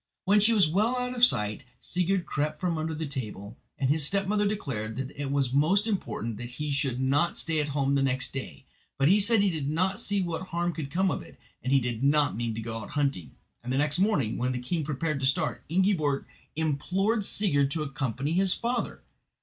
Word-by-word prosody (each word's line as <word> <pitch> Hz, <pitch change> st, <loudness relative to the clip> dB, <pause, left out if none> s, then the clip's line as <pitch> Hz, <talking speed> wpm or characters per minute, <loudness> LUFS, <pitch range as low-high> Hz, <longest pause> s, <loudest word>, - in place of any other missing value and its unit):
When 205 Hz, +2 st, +5 dB
she 215 Hz, +3 st, +4 dB
was 205 Hz, -7 st, +4 dB
well 210 Hz, +10 st, +1 dB
out 250 Hz, 0 st, -2 dB
of 245 Hz, -1 st, -2 dB
sight 105 Hz, -, +4 dB, 0.2 s
Sigurd 180 Hz, 0 st, -1 dB
crept 150 Hz, 0 st, -2 dB
from 180 Hz, -3 st, 0 dB
under 160 Hz, 0 st, -2 dB
the 160 Hz, +1 st, -3 dB
table, 110 Hz, -6 st, -6 dB, 0.2 s
and 135 Hz, -, 0 dB
his 155 Hz, 0 st, +3 dB
stepmother 200 Hz, +5 st, +1 dB
declared 120 Hz, -, -3 dB
that 130 Hz, +1 st, -4 dB
it 145 Hz, -1 st, -5 dB
was 135 Hz, -3 st, 0 dB
most 175 Hz, +9 st, +3 dB
important 115 Hz, -, -3 dB
that 120 Hz, 0 st, -6 dB
he 150 Hz, +4 st, -4 dB
should 135 Hz, -3 st, 0 dB
not 145 Hz, +6 st, +2 dB
stay 160 Hz, -2 st, 0 dB
at 150 Hz, -1 st, -1 dB
home 140 Hz, -1 st, 0 dB
next 135 Hz, -1 st, 0 dB
day; 135 Hz, 0 st, -6 dB, 0.3 s
but 140 Hz, 0 st, +3 dB
he 200 Hz, +3 st, +5 dB
said 215 Hz, +1 st, +5 dB
he 200 Hz, -2 st, +3 dB
did 150 Hz, -4 st, -2 dB
not 185 Hz, +6 st, 0 dB
see 205 Hz, -3 st, +1 dB
what 175 Hz, +1 st, -4 dB
harm 175 Hz, 0 st, -1 dB
could 155 Hz, -4 st, -5 dB
come 185 Hz, +5 st, +1 dB
of -, -, -3 dB
it, -, -, -14 dB, 0.2 s
and 130 Hz, -, -2 dB
he 135 Hz, -, +5 dB
did 120 Hz, -1 st, -3 dB
not 145 Hz, +1 st, +3 dB
mean 115 Hz, 0 st, -2 dB
to 115 Hz, -, -4 dB
go 115 Hz, 0 st, -4 dB
out -, -, -8 dB
hunting, 140 Hz, -, -1 dB, 0.3 s
and 125 Hz, -, -4 dB
the 130 Hz, -, +1 dB
next 145 Hz, +3 st, +1 dB
morning, 170 Hz, -, +1 dB
when 125 Hz, +1 st, 0 dB
the -, -, -2 dB
king 150 Hz, +7 st, -2 dB
prepared 150 Hz, +1 st, -2 dB
to 135 Hz, -, +1 dB
start, 135 Hz, -, 0 dB
Ingiborg 165 Hz, -6 st, +1 dB, 0.3 s
implored 180 Hz, +8 st, 0 dB
Sigurd 145 Hz, -10 st, +1 dB
to 155 Hz, +2 st, -1 dB
accompany 135 Hz, 0 st, -3 dB
his 185 Hz, +2 st, +3 dB
father. 240 Hz, +1 st, -3 dB
150 Hz, 215 wpm, -28 LUFS, 135-190 Hz, 0.3 s, When